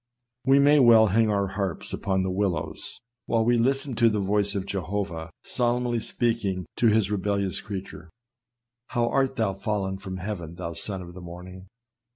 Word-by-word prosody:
We 135 +1 +6
may 145 +1 +6
well 115 -4 +7
hang 115 0 +4
our 100 -2 +1
harps 100 -3 -3
upon 95 -2 0
the 95 - -1
willows, 85 -5 -2 0.3
while 115 -1 +2
we 120 0 +3
listen 135 +2 +1
to 115 - +5
the 105 -1 0
voice 100 +1 +1
of 95 -1 -2
Jeho 100 +1 -2
vah 80 -1 -7
solemnly 120 -1 0
speaking 110 -6 -1
to 120 - +4
his 105 -2 +3
rebellious 100 -1 -1
creature. 95 -4 -7 0.8
"How 120 -1 0
art 135 -1 +1
thou 110 -5 0
fallen 95 -1 -2
from 95 -1 -6
heaven, 90 -4 -5
thou 85 -1 -5
son 95 +1 -4
of 85 0 -11
the 90 - -10
morning!" 90 +2 -10
100 Hz, 175 wpm, -26 LUFS, 95-115 Hz, 0.8 s, well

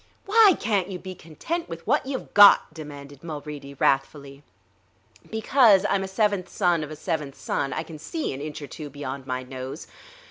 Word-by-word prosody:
"Why 415 -3 +6
can't 200 -4 0
you 185 - -5
be 185 +1 -8
content 185 - -5
with 165 0 -8
what - - +1
you've 265 -2 -5
got?" 205 -5 +7
demanded 145 -2 -10
Mulready 150 -3 -7
wrathfully. 140 +1 -1 0.9
"Because 220 -3 +4
I'm 200 - +1
a - - -4
seventh 200 -2 0
son 175 -5 +1
of 150 - -7
a 155 - -7
seventh 150 -4 -3
son; 140 - -2
I - - -3
can 160 -2 -11
see 310 - -4
an 135 - -7
inch 150 0 -6
or - - -7
two 150 +2 -8
beyond 135 -1 -7
my 130 0 -3
nose. 130 +4 -7
155 Hz, 180 wpm, -25 LUFS, 140-200 Hz, 0.9 s, got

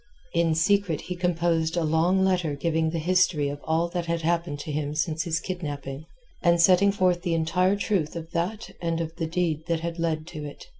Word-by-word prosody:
In 170 -2 +2
secret 185 -1 +2
he 180 - -5
composed 170 -2 0
a 170 - +2
long 170 +5 +3
letter 180 -6 +1
giving 160 +2 0
the 165 - -3
history 165 -3 +2
of 145 0 -5
all 165 +2 +1
that 175 -1 -3
had 165 -1 -1
happened 170 -2 0
to 150 - -5
him 150 0 -2
since 160 0 -1
his 165 -1 0
kidnapping, 145 -5 -5 0.4
and 170 -1 +4
setting 185 +3 +5
forth 185 -3 +1
the 170 -2 0
entire 180 +4 +2
truth 195 -7 -1
of 165 0 -7
that 180 +7 -3
and 165 -1 -1
of 165 0 -4
the 165 - -2
deed 160 -2 -1
that 165 -1 0
had 170 0 -4
led 160 -2 -1
to 155 -3 -7
it. 145 - -9
165 Hz, 205 wpm, -26 LUFS, 160-180 Hz, 0.4 s, setting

